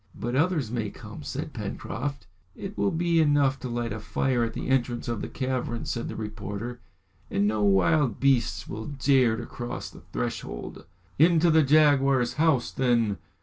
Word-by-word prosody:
"But 120 +2 -2
others 150 -5 +1
may 115 -4 -2
come," - - -10
said - - -5
Pencroft. 140 +5 -5 0.3
"It 195 +1 -7
will - - +1
be 170 -1 +1
enough 145 -3 +3
to 125 - -5
light 120 -1 -2
a 110 - -5
fire 120 +3 0
at 115 -1 -2
the - - -5
entrance 125 -2 0
of 115 -3 -2
the - - -3
cavern," 130 -3 -3
said 120 - -3
the - - -6
reporter, 110 +2 -5 0.5
"and 100 - +1
no 105 0 0
wild 100 - +3
beasts 120 -9 +2
will 110 +1 -6
dare 135 -5 +3
to 120 - -5
cross 120 +1 -6
the - - -13
threshold." - - -5 0.3
"Into 165 +1 +5
the 160 0 +6
jaguar's 140 -4 +4
house, 155 -7 +3
then!" 115 -7 +1
125 Hz, 170 wpm, -27 LUFS, 110-145 Hz, 0.5 s, the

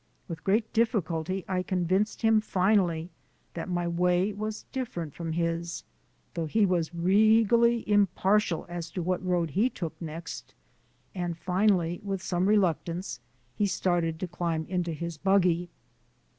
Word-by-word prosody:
With 160 -2 -7
great 215 +4 +1
difficulty 190 -5 0
I 185 -1 0
convinced 185 +4 0
him 220 -1 +5
finally 185 -4 +1 0.4
that 170 +1 -5
my 175 -1 -1
way 180 +3 +1
was 215 +1 -4
different 175 - -4
from 165 -2 -4
his 170 0 -2 0.5
though 165 -2 -2
he 210 +7 +3
was 175 -4 0
regally 220 +5 +4
impartial 200 -2 +2
as 170 -1 -5
to 180 - -2
what 185 +1 -1
road 175 -3 0
he 215 - +2
took 170 -9 -5
next 165 0 -7 0.6
and, 175 -3 -3
finally, 180 -2 +1
with 195 -2 -3
some 180 +1 0
reluctance, 180 -5 0 0.4
he 205 - +1
started 175 -4 0
to 185 - -3
climb 170 -2 -2
into 175 -2 -1
his 170 0 -5
buggy. 180 -2 +2
180 Hz, 140 wpm, -28 LUFS, 170-200 Hz, 0.6 s, him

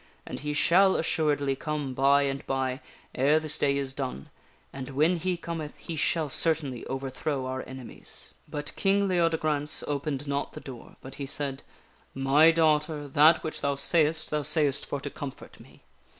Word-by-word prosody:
And - - -6
he 150 0 -3
shall 190 +5 +4
assuredly 145 -4 +1
come 150 -2 -4
by 140 +2 +4
and 135 0 -2
by 130 0 -2 0.3
ere 145 +4 +3
this 155 -1 +1
day 140 -1 +2
is 135 -1 -3
done, 130 - -5 0.4
and 135 -1 -7
when 155 +6 +2
he 180 +1 -2
cometh, 165 -3 -6
he 165 - -7
shall 160 +1 +2
certainly 145 -4 +2
overthrow 135 +1 -3
our 130 0 -3
enemies." 130 -2 -6
But 145 0 -5
King 200 0 +2
Leodegrance 160 -4 0
opened 145 -1 -3
not 140 0 -2
the - - -7
door, 125 -4 -11
but 135 0 -9
he 140 - -3
said: 140 -1 -2 0.3
" - - -34 0.2
My 155 +4 +7
daugh 160 -2 +3
ter, 150 -1 -6
that 155 +3 +5
which 155 - -3
thou 140 0 0
sayest 155 +2 +2
thou 150 0 0
sayest 145 -2 +2
for 145 - -3
to 145 - -5
comfort 140 -2 -9
me. - - -18
145 Hz, 175 wpm, -27 LUFS, 135-155 Hz, 0.4 s, My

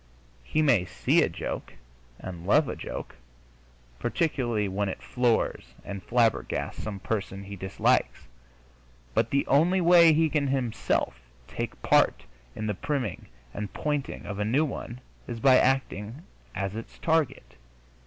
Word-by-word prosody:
He 155 - 0
may 120 -11 +4
see - - +2
a - - +2
joke - - -5 0.4
and 90 -1 -8
love 150 +7 +4
a - - -3
joke, - - -7 0.8
particularly 120 - 0
when 100 +1 -1
it - - -6
floors 115 - 0
and 100 -1 -6
flabbergasts 115 +3 0
some 105 -2 -5
person 100 -2 -3
he 100 0 -8
dislikes, 95 -10 0 0.9
but 110 - +2
the 140 - +1
only 170 +7 +3
way 170 -1 +7
he 160 +1 +3
can 145 -1 0
himself 125 - -1 0.3
take - - -5
part - - +3 0.3
in 110 - -4
the 105 - 0
priming 130 -2 -3 0.3
and 105 0 -6
pointing 145 -2 -2
of 100 -1 -5
a - - +1
new 130 +9 +2
one 125 -3 -6 0.3
is 120 -2 -5
by 130 +1 +6
acting 130 - 0 0.3
as 95 +1 -3
its 115 - -8
target. 155 - 0
115 Hz, 145 wpm, -27 LUFS, 100-140 Hz, 0.9 s, way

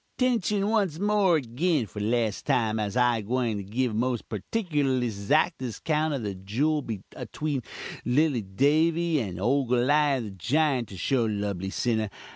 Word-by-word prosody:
"'Tention 210 -5 +1
once 200 -8 +1
more 200 -3 +3
agin, 140 +2 0
for 105 +1 -9
lass 110 0 0
time, 110 -2 +1
as 105 +2 -2
I'm 120 -2 +3
gwyin 120 0 -1
to 100 - -5
give 115 +4 -1
most 120 +1 -1
purtikurlust 130 - -1
'zactest 145 - +1
'count 155 -1 +1
of 130 - -4
the 100 -2 -3
juul 115 +3 -1
atween 150 -4 -3 0.4
lilly 135 0 +2
Davy 155 - +2
and 95 -7 -4
ole 130 +6 +1
Goliawh 135 +2 +2
the 105 - -6
jiunt, 125 - +1
to 95 - -10
show, 120 +5 +1
lubly 100 -3 -2
sinnah! 110 0 0
125 Hz, 150 wpm, -27 LUFS, 110-155 Hz, 0.4 s, more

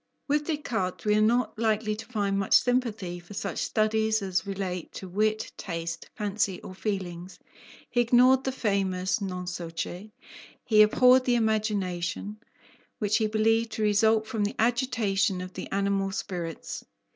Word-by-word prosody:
With 295 +1 +1
Descartes, 230 - -2
we 210 - +3
are 215 - +3
not 235 +1 +2
likely 215 -1 +1
to 215 - -8
find 200 -4 -1
much 195 - +3
sympathy 225 -8 +1
for 175 +4 -12
such 200 - -3
studies 220 0 +1
as 190 0 -1
relate 190 -3 -4
to 190 - -7
wit, 215 +4 0
taste, 165 -2 -5
fancy, 205 -3 -1
or - - -8
feelings. 185 -3 -4 0.5
He 245 - +2
ignored 250 +2 +5
the 265 - -1
famous 195 -5 0
non 180 -2 -4
so 175 -2 -5
che; 175 +5 -6 0.5
he 215 -2 +5
abhorred 250 +4 +6
the 245 - +3
imagination, 210 -3 -1 0.6
which 210 -1 +1
he 220 -2 +1
believed 225 +1 +1
to 220 - -2
result 220 +1 +3
from 220 -1 -2
the 205 - -2
agitation 225 -5 +1
of 185 0 -7
the - - -7
animal 195 0 0
spirits. 175 -4 -5
210 Hz, 155 wpm, -27 LUFS, 190-225 Hz, 0.6 s, abhorred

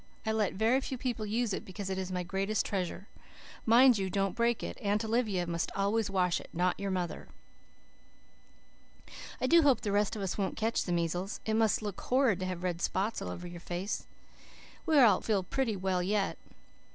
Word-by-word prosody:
I 220 - +1
let 215 -3 +1
very 225 +6 +3
few 260 - -4
people 235 -4 -3
use 225 0 0
it - - -3
because 195 +1 -7
it 190 - -2
is 185 0 -4
my 180 -1 -2
greatest 195 +4 -1
treasure. 190 0 -3 0.6
Mind 240 0 +6
you 190 -1 -1
don't 195 0 0
break 235 0 +1
it. - - -5
Aunt 210 +1 0
Olivia 215 -6 0
must 170 -1 -2
always 205 +2 +1
wash 180 -3 +1
it, - - -13
not 180 +2 0
your 200 0 -2
mother. 180 -2 -3 2.1
"I - - 0
do 335 +5 +6
hope 275 -6 +4
the 205 - -2
rest 205 +2 +1
of 205 - -4
us 190 +2 -3
won't 195 - -1
catch 225 +1 0
the 180 - -3
measles. 175 +3 -1
It 220 - 0
must 220 -1 +2
look 205 -2 -5
horrid 250 -7 +2
to 185 - -2
have 180 -1 -4
red 175 -2 -2
spots 200 +6 -1
all - - -4
over 135 - -6
your 175 0 -8
face. 175 +4 -4 0.8
We 315 - +4
all 225 -9 +6
feel 205 -4 0
pretty 230 +3 -1
well 185 -1 0
yet. 195 +2 0
200 Hz, 200 wpm, -31 LUFS, 185-225 Hz, 2.1 s, Mind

